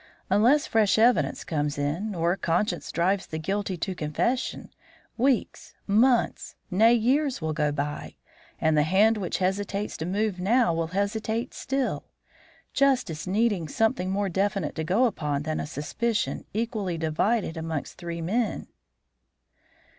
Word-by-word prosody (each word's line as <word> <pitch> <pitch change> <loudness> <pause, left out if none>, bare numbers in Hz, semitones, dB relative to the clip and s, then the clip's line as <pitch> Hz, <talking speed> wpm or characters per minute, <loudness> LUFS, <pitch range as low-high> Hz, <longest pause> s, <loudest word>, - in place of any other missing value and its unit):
Unless 245 +10 +4
fresh 220 -2 +3
evidence 220 - +3
comes 145 -2 -2
in, 165 +9 -2
or 170 +1 +1
conscience 175 +1 -1
drives 190 +3 +1
the 160 - -5
guilty 195 +3 -2
to 190 +3 -3
confession, 185 - -2 0.4
weeks, 255 0 0
months, 230 +4 +2 0.2
nay, 220 +5 +5
years 260 +4 +1
will 160 -1 -2
go 150 -1 +1
by, 145 0 -4 0.4
and 160 0 +2
the 150 - +4
hand 195 +8 +4
which 185 -4 -2
hesitates 195 +2 -1
to 160 - -4
move 200 0 -1
now 215 0 +3
will 165 0 -1
hesitate 220 +4 -1
still; 270 -1 -2 0.7
justice 255 - +1
needing 200 -4 +1
something 220 - 0
more 200 +1 0
definite 195 -3 -1
to 160 - -3
go 195 +10 +3
upon 150 - -1
than 155 0 -2
a - - -3
suspicion 210 +9 -2
equally 215 -5 -2
divided 165 +5 0
amongst 160 -2 -5
three 170 -1 -5
men." 220 +8 -1
195 Hz, 140 wpm, -26 LUFS, 160-225 Hz, 0.7 s, nay